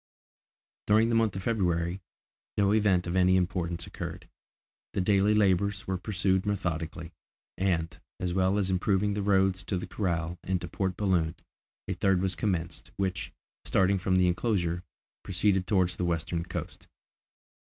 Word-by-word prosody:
During 110 +2 +4
the 115 - +2
month 115 -4 +2
of 95 - -4
February, 90 -4 0 0.6
no 100 0 +3
event 100 -5 +3
of 85 +1 -3
any 95 0 +4
importance 85 -2 -1
occurred. - - -7 0.7
The - - 0
daily 100 +2 +3
labours 100 0 +2
were 95 -1 -2
pursued 95 -1 0
methodically, 85 -4 -3 0.4
and, 85 -4 0 0.2
as 90 -1 -2
well 95 +2 +2
as 95 -2 +1
improving 100 +2 +1
the 105 - -2
roads 95 -2 +2
to 95 - -1
the 90 - -4
corral 85 -3 -2
and 95 -1 0
to 85 - -6
Port 95 +1 -2
Balloon, 90 -5 +1 0.5
a 95 - -1
third 95 +1 +2
was 95 0 0
commenced, 90 -4 -2
which, 95 -2 -2 0.3
starting 95 +1 +2
from 95 0 +1
the 90 -1 +4
enclosure, 90 -2 0 0.4
proceeded 95 0 +1
towards 90 -3 +2
the 90 - -2
western 85 0 -1
coast. - - -6
95 Hz, 155 wpm, -29 LUFS, 90-100 Hz, 0.7 s, During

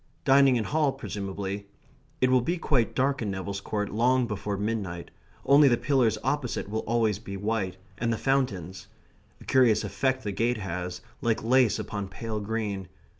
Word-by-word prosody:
Dining 135 -1 +6
in 115 - +1
Hall, 150 +3 +1
presumably. 100 -5 -5 0.5
It 130 0 +4
will 130 -1 +5
be 170 +9 -1
quite 120 -8 +1
dark 135 +1 +1
in 105 - -2
Neville's 95 +1 -4
Court 105 0 -3
long 125 +3 +3
before 105 -2 -3
midnight, 100 -5 -3 0.3
only 140 +2 +7
the 120 -3 +4
pillars 130 -6 +2
opposite 145 -9 -1
will 110 +2 -2
always 110 -3 +1
be 100 -3 -7
white, 100 -3 -2 0.2
and 120 0 0
the 115 - 0
fountains. 100 -11 -1 0.5
A - - -13
curious 120 -5 +4
effect 130 +7 -1
the 105 - -2
gate 115 +4 0
has, 90 -2 -4 0.2
like 115 -4 0
lace 125 -1 +4
upon 100 -1 -4
pale 110 +2 -5
green. 105 -3 -3
110 Hz, 170 wpm, -27 LUFS, 100-130 Hz, 0.5 s, only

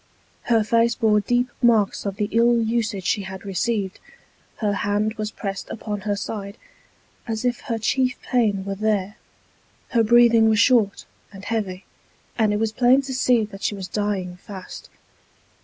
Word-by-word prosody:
Her 230 -2 +3
face 230 +2 +2
bore 215 -2 +3
deep 245 +3 0
marks 220 -4 +2
of 195 - -3
the 205 0 -1
ill 235 +1 +4
usage 225 -4 -1
she 205 - +1
had 190 0 -8
received: 195 0 -2 0.6
her 210 -2 -1
hand 205 +2 0
was 215 -1 -4
pressed 195 -2 -6
upon 210 -2 -5
her 205 +1 -1
side, 200 +1 -6 0.7
as 225 +1 -3
if 245 -1 0
her 230 -4 -2
chief 255 +3 0
pain 210 -6 +1
were 200 - -3
there; 205 -1 -1 0.7
her 235 - +2
breathing 230 0 +5
was 220 - +3
short 230 -4 +3 0.3
and 195 0 -11
heavy; 205 -4 -3 0.5
and 220 -3 +2
it 210 - +1
was 220 0 0
plain 250 +4 +4
to 265 -1 -5
see 250 -3 +2
that 200 -1 -12
she 205 - -1
was 190 -2 -6
dying 195 -4 -2
fast. 190 0 -10
215 Hz, 165 wpm, -23 LUFS, 200-235 Hz, 0.7 s, breathing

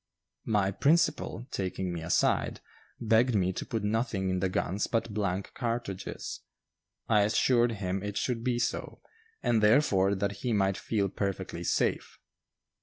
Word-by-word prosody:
My 100 -3 +2
principal, 145 - +1
taking 95 -1 -3
me 85 - -4
aside, 80 +1 +1 0.4
begged 115 +2 +3
me 95 -2 +2
to - - -5
put 110 -2 -2
nothing 105 -3 0
in 95 - 0
the 95 0 0
guns 95 +2 -1
but 115 -2 -1
blank 100 -2 -2
cartridges. 115 -5 -4 0.7
I 105 -1 +4
assured 120 +3 +3
him 95 -2 -3
it 105 0 -4
should 120 -3 -1
be 125 -1 +1
so, 120 - -3 0.4
and 115 -2 +2
therefore 105 -4 +4
that 100 0 -2
he 120 +3 -2
might 95 -2 +2
feel 100 0 -1
perfectly 95 -3 -3
safe. - - 0
105 Hz, 145 wpm, -29 LUFS, 95-115 Hz, 0.7 s, I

